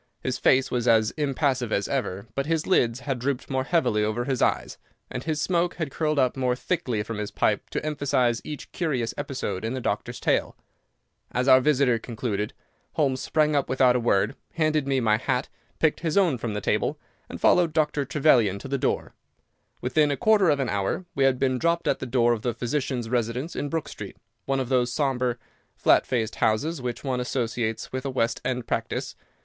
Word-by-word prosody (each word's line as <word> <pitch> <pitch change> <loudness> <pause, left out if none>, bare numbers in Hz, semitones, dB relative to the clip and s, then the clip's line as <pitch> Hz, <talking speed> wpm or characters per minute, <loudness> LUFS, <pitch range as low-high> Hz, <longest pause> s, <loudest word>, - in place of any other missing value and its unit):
His 130 - -2
face 130 0 +3
was 120 -1 -1
as 110 -2 +4
impassive 135 -5 0
as 100 - 0
ever, 110 -8 -2
but 140 +1 -2
his 165 -1 0
lids 125 -9 +2
had 135 -4 -2
drooped 135 +2 -2
more 130 0 0
heavily 140 -11 +2
over 110 +3 -1
his 130 -2 -1
eyes, - - 0 0.3
and 125 - -4
his 155 -2 -1
smoke 175 +2 +1
had 160 -5 -3
curled 155 0 -1
up 130 -2 +2
more 125 -2 +1
thickly 125 -7 -2
from 110 0 -5
his 105 -1 -3
pipe - - 0
to - - -3
emphasize 130 -5 +1
each 150 -2 -7
curious 135 -10 -1
episode 105 -8 -4
in 115 +3 -2
the - - -2
doctor's 120 +1 -3
tale. - - 0 0.7
As 125 +2 -1
our 130 -1 +7
visitor 130 -4 +3
concluded, 110 -2 -3 0.4
Holmes 135 -5 +1
sprang 155 -1 +1
up 140 - +1
without 130 -1 +4
a - - +2
word, 110 -3 +1 0.2
handed 155 -3 +1
me 135 -1 +2
my 110 -3 +3
hat, 125 +2 -1 0.3
picked 160 -2 +2
his 165 +1 -1
own 170 -11 +3
from 110 -2 -3
the 105 - -2
table, - - 0 0.3
and - - -7
followed 175 -2 +4
Dr. 150 -2 +1
Trevelyan 130 -8 +3
to 100 - -8
the 140 0 -1
door. - - -1 0.7
Within 150 +4 +2
a 140 - -1
quarter 205 +1 +4
of 145 -2 +2
an 135 - 0
hour 100 - -1
we 135 - +2
had 135 -1 +3
been 130 -1 +1
dropped 170 +2 +1
at - - +1
the 130 - -5
door 120 -1 +3
of 115 - -3
the 120 -1 -2
physician's 125 0 -2
residence 125 +6 -2
in 145 - -2
Brook 165 0 -2
Street, - - -8 0.3
one 135 0 0
of 130 -2 -3
those 125 -2 +2
sombre, 125 -3 0 0.4
flat - - +3
faced 115 -3 -1
houses 135 +8 +1
which 125 -1 -4
one 130 -3 -1
associates 120 -3 -2
with 130 0 -3
a 140 - -2
West 115 -3 0
End 125 -2 -2
practice. - - -3
130 Hz, 200 wpm, -25 LUFS, 120-145 Hz, 0.7 s, our